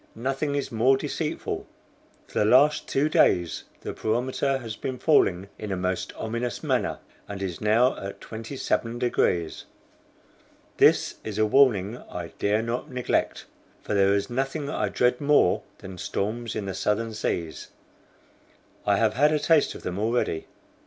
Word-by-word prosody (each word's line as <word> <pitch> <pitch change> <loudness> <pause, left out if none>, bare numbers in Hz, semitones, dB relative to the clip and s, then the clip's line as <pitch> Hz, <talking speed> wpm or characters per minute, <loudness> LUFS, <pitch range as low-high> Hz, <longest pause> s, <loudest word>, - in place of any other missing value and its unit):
Nothing 135 +4 -1
is 140 - -2
more 125 +4 +4
deceitful. 150 +2 -3 0.6
For - - -3
the - - +4
last 130 +7 +4
two 140 +3 +1
days 90 - +2 0.2
the - - -5
barometer 130 +4 0
has 115 -4 -6
been 130 +2 -4
falling 100 - +3
in 105 -2 -5
a 95 - -1
most 90 0 -2
ominous 115 +2 -3
manner, - - 0 0.3
and 100 -1 -6
is 95 -3 -4
now 115 +4 +3
at 100 0 -7
27 115 +1 -3
degrees. 90 -9 0 1.1
This - - +4
is 105 -2 -5
a 110 - +3
warning 110 -3 +3
I 85 -2 -6
dare 105 +2 +1
not 120 +6 -3
neglect, 125 -2 -1 0.4
for - - -3
there 100 0 +4
is 100 - -1
nothing 135 +4 -2
I 105 - -1
dread 125 +5 +1
more 145 -10 +4 0.2
than 95 -1 -10
storms 115 +6 -3
in 105 -2 -3
the 95 - -3
Southern 110 +3 -1
Seas; 85 -6 -3 1.2
I 100 -1 +4
have 110 0 +2
had 145 +6 +4
a 155 - +3
taste 155 0 +3
of - - -10
them 90 +2 -3
already. 110 -7 0
115 Hz, 155 wpm, -26 LUFS, 100-135 Hz, 1.2 s, more